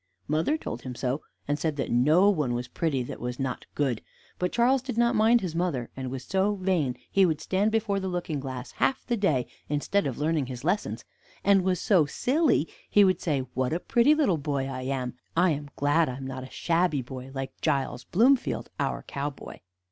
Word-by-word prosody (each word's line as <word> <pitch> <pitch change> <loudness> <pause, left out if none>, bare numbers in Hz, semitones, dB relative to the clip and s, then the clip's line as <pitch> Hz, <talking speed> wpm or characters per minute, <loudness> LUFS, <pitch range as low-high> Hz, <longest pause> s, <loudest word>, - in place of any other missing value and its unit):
Mother 160 - +1
told 120 - -6
him 125 -1 -6
so, 130 +4 -2 0.3
and 145 +1 0
said 155 0 -1
that 140 - -3
no 150 +11 +5
one 145 -10 0
was 120 0 -3
pretty 145 -6 -1
that - - -7
was 125 +1 -4
not 130 -2 -3
good; 130 -6 0 0.4
but 180 0 0
Charles 250 +2 +3
did 255 -3 -5
not 235 0 +3
mind 225 +2 +4
his 180 -4 -3
mother, 165 -9 -1
and 130 -1 -4
was 130 0 -5
so 195 +2 +1
vain 180 -10 0
he 195 - +4
would 160 -5 +2
stand 195 +6 +1
before 215 -3 +1
the 190 - -3
looking 175 -5 -2
glass 130 -1 -6
half 265 - 0
the 240 - 0
day, 155 - +1 0.2
instead 150 +6 +1
of 130 - -4
learning 150 -2 0
his 125 -1 -7
lessons; 180 +6 -1 0.4
and 200 -1 +5
was 185 -1 0
so 180 -8 +3
silly 260 - +2 0.2
he 205 - +6
would 185 -1 +2
say, 145 -5 0
"What 130 +3 0
a 170 - 0
pretty 240 +10 +4
little 250 - +2
boy 140 -2 -1
I 130 -1 -4
am! 130 -2 -3 0.2
I 175 0 +5
am 145 -1 -4
glad 145 +2 +2
I 125 - -4
am 135 - -7
not 130 -1 -5
a 130 - -9
shabby 165 -4 +1
boy, 130 +1 -8
like 135 0 -6
Giles 130 -3 0
Bloomfield, 245 - +2
our - - -1
cowboy." 140 0 -6
155 Hz, 210 wpm, -27 LUFS, 135-195 Hz, 0.4 s, he